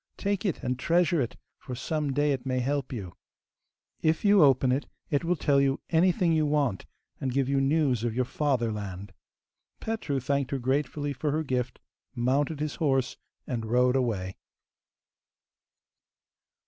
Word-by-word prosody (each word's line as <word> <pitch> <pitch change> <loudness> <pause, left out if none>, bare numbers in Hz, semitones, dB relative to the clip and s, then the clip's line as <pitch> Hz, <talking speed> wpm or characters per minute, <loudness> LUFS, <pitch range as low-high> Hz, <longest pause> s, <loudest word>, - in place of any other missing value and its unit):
Take 200 0 -1
it, 180 - -3
and 125 0 -2
treasure 170 +1 +2
it, 120 - -3 0.2
for 125 - -7
some 150 +3 -2
day 145 +2 +2
it 130 -3 -2
may 130 -1 -1
help 140 +2 -1
you. 100 -9 -6 0.9
If 160 +5 +1
you 200 -2 +6
open 135 -3 +5
it, 135 +3 -1 0.2
it 145 +1 +1
will 175 +2 +1
tell 140 -3 +2
you 135 0 +1
anything 175 +1 +3
you 155 -1 +2
want, 145 -9 0 0.3
and 130 - -2
give 135 0 +1
you 135 0 +2
news 135 -4 +2
of 115 -2 -1
your 130 0 +1
fatherland.' 105 -9 -2 0.7
Petru 220 -11 -2
thanked 140 +1 -1
her 140 - -1
gratefully 140 +3 -1
for 145 +3 -2
her 155 +2 0
gift, 125 -3 -2 0.4
mounted 135 +5 0
his 150 -1 -3
horse, 135 -5 +1 0.3
and 120 -3 -3
rode 125 +2 +3
away. 105 -8 -1
135 Hz, 155 wpm, -28 LUFS, 125-150 Hz, 0.9 s, you